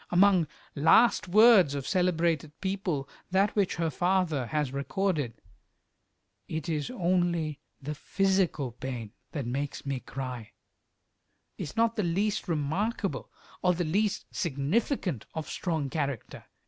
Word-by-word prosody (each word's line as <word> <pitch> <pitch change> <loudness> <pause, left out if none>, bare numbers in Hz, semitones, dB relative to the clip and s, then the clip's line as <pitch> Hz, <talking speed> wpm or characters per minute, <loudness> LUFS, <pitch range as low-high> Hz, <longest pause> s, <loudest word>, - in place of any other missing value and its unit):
Among 180 -2 +5 0.3
"last 185 +12 +5
words" 200 - +6
of 140 -2 -3
celebrated 165 -4 +1
people, 190 -8 -2 0.2
that 195 +2 +2
which 200 -3 +1
her 165 -1 0
father 175 -5 +1
has 150 -2 -1
recorded, 145 - -1 1.1
"It 160 -2 -4
is 155 +1 -1
only 175 - 0 0.2
the 150 +2 -4
physical 185 -5 0
pain 120 -3 -6 0.2
that 145 -5 -3
makes 140 +5 -3
me 135 -2 -2
cry," 125 -4 -6 1.1
is 145 - -6
not 230 0 +2
the - - +2
least 200 +5 0
remarkable, 180 +7 -1 0.3
or 180 -1 +3
the 175 - 0
least 200 +6 0
significant 170 - -1
of 160 -1 -4
strong 160 -5 -2
character. 140 -4 -4
165 Hz, 120 wpm, -29 LUFS, 140-190 Hz, 1.1 s, words